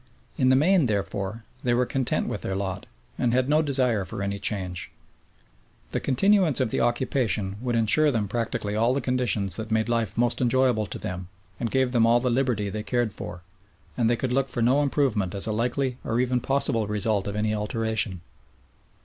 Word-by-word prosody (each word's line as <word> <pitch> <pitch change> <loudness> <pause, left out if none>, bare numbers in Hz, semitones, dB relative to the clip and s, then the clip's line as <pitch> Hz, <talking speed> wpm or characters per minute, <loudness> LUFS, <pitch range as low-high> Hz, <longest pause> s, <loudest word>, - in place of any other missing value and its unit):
In 130 - +2
the 130 - +5
main, 165 +1 +4
therefore, 100 +1 -3 0.2
they 120 -1 +2
were 125 +1 +2
content 130 0 -1
with - - -4
their 95 - -3
lot, 95 0 -4 0.3
and 120 0 +1
had 130 0 +2
no 150 +2 +3
desire 130 -8 +2
for 95 +2 -5
any 100 0 -3
change. 95 -4 -1 1.0
The - - -1
continuance 180 - +3
of 110 - 0
the - - 0
occupation 120 -5 0
would 125 -2 -1
ensure 115 +7 +3
them 110 -6 0
practically 105 -1 -2
all 115 +4 +2
the - - +1
conditions 120 -6 0
that 110 -1 -5
made 110 0 +1
life 115 -4 -1
most 120 +1 +1
enjoyable 125 -3 +2
to - - -6
them 90 -1 -6 0.3
and 115 - -1
gave 130 0 +1
them 115 -2 +3
all 120 +1 +5
the 125 0 0
liberty 120 -5 0
they 105 +2 -4
cared 120 -2 -1
for, 90 -1 -8 0.5
and 115 -2 +1
they 120 - +3
could 125 +1 -2
look 135 +1 +1
for 120 - -1
no 130 +5 +3
improvement 125 -10 0
as 100 - +2
a 110 - -1
likely 125 +3 -1
or 115 +1 -1
even 125 0 +1
possible 115 -5 0
result 105 -1 +1
of 100 - -4
any 105 0 0
alteration. 105 -3 -1
115 Hz, 195 wpm, -25 LUFS, 105-130 Hz, 1.0 s, the